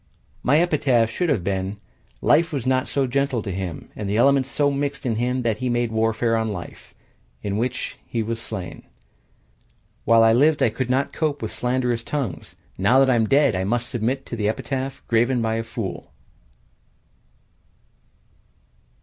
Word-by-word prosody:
My 140 +4 +3
epitaph 140 -9 +2
should 175 +9 -1
have 95 - +1
been: 95 +1 -2 0.5
"Life 165 +1 +4
was 140 -6 -3
not 130 +1 +1
gentle 135 -3 0
to 100 - -4
him, 90 -3 -5
And 100 - -4
the 105 - 0
elements 135 +2 +4
so 145 0 +1
mixed 140 0 -3
in 115 -3 0
him 125 +2 0
That 110 -2 0
he 130 - -1
made 120 -1 0
warfare 115 +1 +1
on 110 -1 0
life 90 -5 -9 0.5
In 100 - -2
the 105 - -1
which 125 +2 -3
he 115 -2 -2
was 115 +1 -4
slain." 95 -6 -6 1.2
While 115 0 +5
I 115 0 +5
lived 150 +5 +4
I 115 - +3
could 125 +2 -3
not 135 +2 0
cope 150 -2 -1
with - - -3
slanderous 125 -1 -1
tongues, 130 - -4 0.2
Now 100 +7 +4
that 135 -1 +5
I - - +4
am 110 -2 +1
dead 140 -3 +4
I 95 0 -1
must 120 +4 -1
submit 125 +4 -2
to - - -5
an 110 - -5
epitaph 130 +5 -2
Graven 120 +2 +2
by 110 -1 0
a 115 - -2
fool! 115 -5 -6
120 Hz, 175 wpm, -23 LUFS, 110-135 Hz, 1.2 s, While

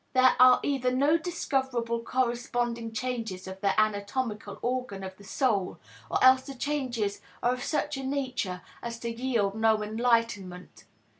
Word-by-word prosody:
There 255 -1 +5
are 255 0 +8
either 270 -3 +1
no 280 +5 +3
discoverable 265 -9 -1
corresponding 240 -1 -1
changes 225 -5 -4
of 190 0 -8
the 200 0 +2
anatomical 210 0 -1
organ 245 -6 -2
of 190 0 -7
the 205 - -15
soul, 205 -3 0 0.3
or - - +1
else 260 0 +7
the 275 +1 -9
changes 250 -7 -2 0.2
are 245 +1 +3
of 250 -1 -5
such 295 -2 -1
a 270 - -5
nature 255 -9 -2 0.2
as 235 -1 -5
to 235 - -2
yield 230 -4 0
no 220 0 +2
enlightenment. 215 -5 -1
235 Hz, 150 wpm, -28 LUFS, 210-260 Hz, 0.3 s, are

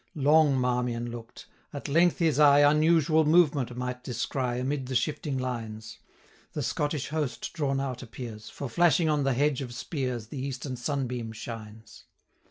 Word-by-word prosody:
Long 150 -1 +4
Marmion 125 -1 -1
look'd: 115 -1 -10 0.3
at 145 - -6
length 170 +4 +3
his 160 -4 +2
eye 145 -1 +7
Unusual 160 +1 +4
movement 145 -6 +3
might 125 0 -4
descry 125 0 -2
Amid 135 0 -2
the 130 - -4
shifting 145 +3 -1
lines: 115 -4 -5 0.5
The - - -3
Scottish 145 -1 -2
host 150 -4 -3
drawn 140 -4 -1
out 130 -2 -3
appears, 115 -3 -8
560 - - -16
For, 140 - -3
flashing 170 +4 +3
on 150 -2 +1
the 135 - +2
hedge 145 +1 +1
of 120 -3 -6
spears, 125 -5 -4
The 130 0 -5
eastern 135 -1 -4
sunbeam 125 -3 -3
shines. 110 -1 -9
130 Hz, 160 wpm, -28 LUFS, 120-150 Hz, 0.5 s, eye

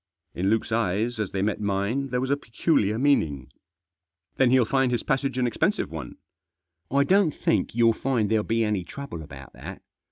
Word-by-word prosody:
In 95 +3 -1
Luke's 110 +1 0
eyes, 110 +2 0
as 105 -3 -2
they 95 0 -1
met 105 +1 -1
mine, 100 +7 -1
there 125 0 -1
was 130 +2 -2
a - - +4
peculiar 115 -4 0
meaning. 80 - +1 0.4
" 85 0 -57
Then 130 -2 +4
he'll 130 -1 +4
find 135 +2 +1
his 120 -2 -1
passage 135 0 -1
an 125 - +2
expensive 165 - 0
one." 80 -3 -7 0.7
"I 140 +1 +3
don't 185 -1 +3
think - - 0
you'll 115 -1 +4
find 120 -2 0
there'll 110 0 +1
be 115 +1 0
any 105 -4 0
trouble 90 -2 -8
about 70 -3 -11
that. - - -10
115 Hz, 190 wpm, -25 LUFS, 95-135 Hz, 0.7 s, a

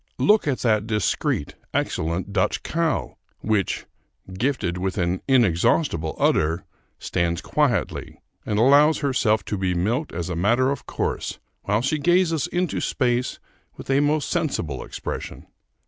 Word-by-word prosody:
Look 210 -5 +3
at 135 -3 0
that 110 -2 +2
discreet, 105 -8 0 0.2
excellent 85 +5 -1
Dutch 95 -2 0
cow, 165 -3 -1 0.2
which, 105 -3 0 0.5
gifted 95 -5 -1
with 95 +2 -2
an 90 0 0
inexhaustible 95 - +2
udder, 80 +3 +1 0.3
stands 85 -1 -1
quietly - - -1 0.2
and 105 - -2
allows 145 +7 +5
herself 125 -6 +1
to 105 - -3
be 90 -2 0
milked 115 - 0
as 85 0 -4
a 90 - -3
matter 120 +10 +2
of 140 - -5
course, - - -3 0.3
while 105 +2 +1
she 150 +3 0
gazes 175 -2 +2
into 180 -1 -1
space 125 -1 0 0.4
with - - -5
a 135 - +4
most 145 0 +1
sensible 135 - -1
expression. - - -6
110 Hz, 135 wpm, -23 LUFS, 90-145 Hz, 0.5 s, allows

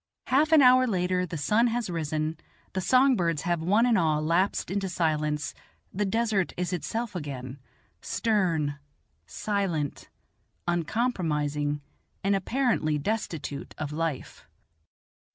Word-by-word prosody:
Half 290 +5 +3
an 310 -3 +7
hour 255 0 +6
later 180 -3 0
the 165 - -5
sun 210 - +3
has 235 -1 -1
risen, 155 -2 -2 0.3
the 190 - -1
song 260 +6 +4
birds 170 -6 0
have 175 -3 0
one 205 +8 +3
and 235 -5 +3
all 155 -3 +2
lapsed 170 +4 +1
into 195 -1 -1
silence, 150 -4 -1 0.4
the 205 +2 0
desert 215 -5 0
is 180 +1 -2
itself 220 +5 -3
again, 135 -4 -6 0.4
stern, 165 -10 0 0.5
silent, 185 - -2 0.6
uncompromising, 155 - 0 0.4
and 200 +1 +3
apparently 195 - +1
destitute 160 -5 -4
of 150 -1 -4
life. 155 -3 -4
180 Hz, 120 wpm, -27 LUFS, 155-215 Hz, 0.6 s, an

